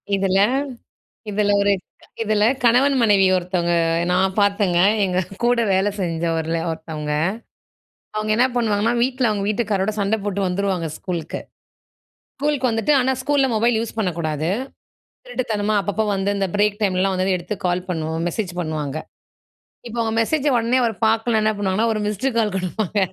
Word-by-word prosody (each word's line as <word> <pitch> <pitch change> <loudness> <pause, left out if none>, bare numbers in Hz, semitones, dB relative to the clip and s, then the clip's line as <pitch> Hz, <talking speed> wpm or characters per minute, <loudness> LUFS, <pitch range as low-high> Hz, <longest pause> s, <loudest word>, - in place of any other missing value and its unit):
இதில 195 -1 +1 0.9
இதில 205 0 +1
ஒரு 200 0 +3 0.3
க் - - -21
இதில 215 -1 +2 0.2
கணவன் 255 +4 +4
மனைவி 205 -4 +4
ஒருத்தவங்க 175 -1 -1 0.4
நான் 190 +1 +2
பார்த்தேங்க. 200 -3 +2 0.3
எங்க 185 -1 0 0.3
கூட 240 0 +3
வேல 190 +2 +2
செஞ்சவர்ல 165 -1 -1
ஒருத்தவங்க. 155 -2 -5 1.0
அவங்க 215 0 -1
என்னா 250 +2 +4
பண்ணுவாங்கன்னா, 225 0 +1
வீட்ல 255 -1 +1
அவங்க 205 -1 -1
வீட்டுக்காரரோட 210 -2 0
சண்ட 200 +2 +1
போட்டு 200 -1 -2
வந்துருவாங்க 185 -2 -1
ஸ்கூலுக்கு. 170 -4 -4 1.0
ஸ்கூலுக்கு 285 -4 0
வந்துட்டு 225 +7 +1
ஆனா 260 +1 +2
ஸ்கூல்ல 280 -1 +2
மொபைல் 230 +1 +2
யூஸ் 225 0 -5
பண்ணக்கூடாது. 165 -5 -1 0.8
திருட்டுத்தனமா 215 - -1
அப்பப்போ 205 +2 -1
வந்து 195 +1 0
இந்த 195 -1 0
பிரேக் 205 0 +1
டைம்லலாம் 190 -1 +1
வந்தோனே 185 0 +1
எடுத்து 175 +4 -5
கால் 180 +1 -1
பண்ணுவோம் 160 -1 -2
மெசேஜ் 185 -1 -3
பண்ணுவாங்க. 155 -2 -3 0.9
இப்ப 235 +1 -7
அவங்க 225 -1 -1
மெசேஜ 290 +5 0
உடனே 235 +2 +1
அவர் 225 -3 0
பார்க்கலன்னா 225 0 +2
என்ன 215 - +2
பண்ணுவாங்கன்னா 205 +3 +1
ஒரு 215 - -2
மிஸ்டு 210 +6 -1
கால் 215 -3 +1
குடுப்பாங்க. 190 +2 -2
205 Hz, 145 wpm, -21 LUFS, 180-225 Hz, 1.0 s, கணவன்